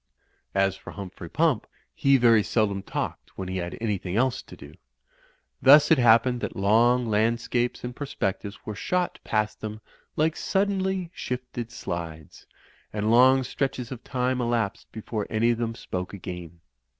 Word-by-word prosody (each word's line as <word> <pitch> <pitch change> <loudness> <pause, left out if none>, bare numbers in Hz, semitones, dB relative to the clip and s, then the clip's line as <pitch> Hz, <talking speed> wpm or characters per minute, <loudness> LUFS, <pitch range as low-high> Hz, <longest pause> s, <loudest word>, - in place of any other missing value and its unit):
As 95 -1 +2
for - - -11
Humphrey 90 -4 -8
Pump, 155 -7 +1 0.3
he 140 0 +4
very 115 -3 +5
seldom 100 -2 0
talked - - -5
when 95 - -4
he 95 0 -3
had 85 -1 -4
anything 100 -5 -2
else 130 +2 +1
to - - -13
do. - - -12 0.9
Thus 145 +3 +7
it 160 - +6
happened 120 +1 +4
that - - -4
long 115 +5 +3
landscapes 115 +3 0
and 125 0 -5
perspectives 100 -7 -4
were 110 - -4
shot 180 - -1
past 105 -1 -1
them 110 0 -5 0.4
like 160 +1 +1
suddenly 190 -2 0
shifted 125 -2 -5
slides, 80 -7 -7 0.4
and 105 0 -3
lc«ig 130 +4 +5
stretches 130 -3 -3
of 125 -3 -7
time 125 0 -1
elapsed 115 -4 -1
before 110 -1 -4
any 115 +2 +2
of 120 - -2
them 115 -1 -2
spoke 90 -1 -5
again. 90 -3 -8
115 Hz, 150 wpm, -26 LUFS, 100-130 Hz, 0.9 s, Thus